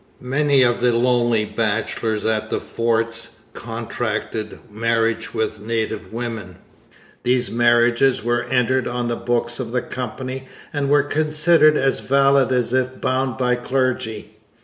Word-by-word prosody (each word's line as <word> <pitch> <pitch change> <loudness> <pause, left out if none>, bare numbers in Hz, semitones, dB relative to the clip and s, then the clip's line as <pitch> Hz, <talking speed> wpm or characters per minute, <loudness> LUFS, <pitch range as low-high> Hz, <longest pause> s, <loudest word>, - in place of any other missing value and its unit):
Many 145 -2 +4
of 120 -1 +1
the 120 -1 +3
lonely 120 -2 +2
bachelors 110 0 -2
at 110 0 0
the - - -1
forts 115 0 -2 0.2
contracted 115 -2 -4
marriage 115 +1 0
with 110 -1 -2
native 110 0 -3
women. 115 -6 -5 0.7
These 125 0 +1
marriages 120 +2 +3
were 120 0 +1
entered 125 +1 +1
on 120 0 -2
the 120 - 0
books 120 0 -2
of 120 -3 -4
the 125 0 0
Company, 130 +1 -6 0.3
and 140 -2 -1
were 145 0 +4
considered 155 +1 +3
as 135 0 +1
valid 135 -1 +3
as 125 -1 +1
if 130 0 0
bound 130 -2 -1
by 125 -1 +1
clergy. 125 -4 -2
120 Hz, 135 wpm, -21 LUFS, 115-130 Hz, 0.7 s, Many